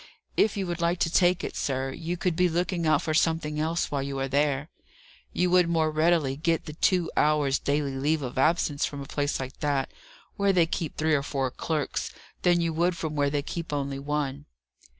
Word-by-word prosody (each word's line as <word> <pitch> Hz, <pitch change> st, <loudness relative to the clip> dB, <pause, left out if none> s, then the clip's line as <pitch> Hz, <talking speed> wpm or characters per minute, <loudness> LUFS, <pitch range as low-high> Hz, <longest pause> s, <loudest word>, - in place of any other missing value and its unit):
If 210 Hz, -1 st, +2 dB
you 195 Hz, -, -1 dB
would 175 Hz, -1 st, -4 dB
like 170 Hz, +1 st, +1 dB
to 165 Hz, -, +2 dB
take 180 Hz, +1 st, +3 dB
it, -, -, -4 dB
sir, 135 Hz, -1 st, -1 dB
you 170 Hz, +5 st, -4 dB
could 175 Hz, -1 st, 0 dB
be 180 Hz, +1 st, +3 dB
looking 170 Hz, 0 st, -1 dB
out 155 Hz, -2 st, +3 dB
for 155 Hz, -, -1 dB
something 160 Hz, -1 st, +1 dB
else 165 Hz, +3 st, -1 dB
while 140 Hz, -1 st, 0 dB
you 135 Hz, 0 st, -4 dB
are 135 Hz, 0 st, -1 dB
there. 145 Hz, +2 st, 0 dB, 0.6 s
You 180 Hz, 0 st, +1 dB
would 180 Hz, -2 st, +4 dB
more 160 Hz, -2 st, +2 dB
readily 155 Hz, -3 st, +2 dB
get 165 Hz, +2 st, 0 dB
the 150 Hz, -, -7 dB
two 175 Hz, +1 st, +1 dB
hours' 150 Hz, -3 st, +2 dB
daily 140 Hz, -1 st, 0 dB
leave 145 Hz, +3 st, 0 dB
of 130 Hz, 0 st, -4 dB
absence 155 Hz, -1 st, +2 dB
from 145 Hz, -1 st, -2 dB
a -, -, -6 dB
place 145 Hz, 0 st, -1 dB
like 130 Hz, 0 st, -6 dB
that, 140 Hz, -2 st, 0 dB, 0.5 s
where 200 Hz, -1 st, +3 dB
they 175 Hz, -3 st, +4 dB
keep 165 Hz, -1 st, -4 dB
three 155 Hz, 0 st, +1 dB
or 145 Hz, -, +3 dB
four 135 Hz, -2 st, -2 dB
clerks, 155 Hz, +2 st, -2 dB, 0.3 s
than 175 Hz, -1 st, +3 dB
you 165 Hz, -1 st, 0 dB
would 170 Hz, +2 st, +1 dB
from 160 Hz, -2 st, -4 dB
where 145 Hz, -1 st, +2 dB
they 145 Hz, 0 st, -1 dB
keep 165 Hz, +1 st, -5 dB
only 140 Hz, -1 st, -2 dB
one." 140 Hz, -1 st, -3 dB
155 Hz, 210 wpm, -27 LUFS, 140-170 Hz, 0.6 s, would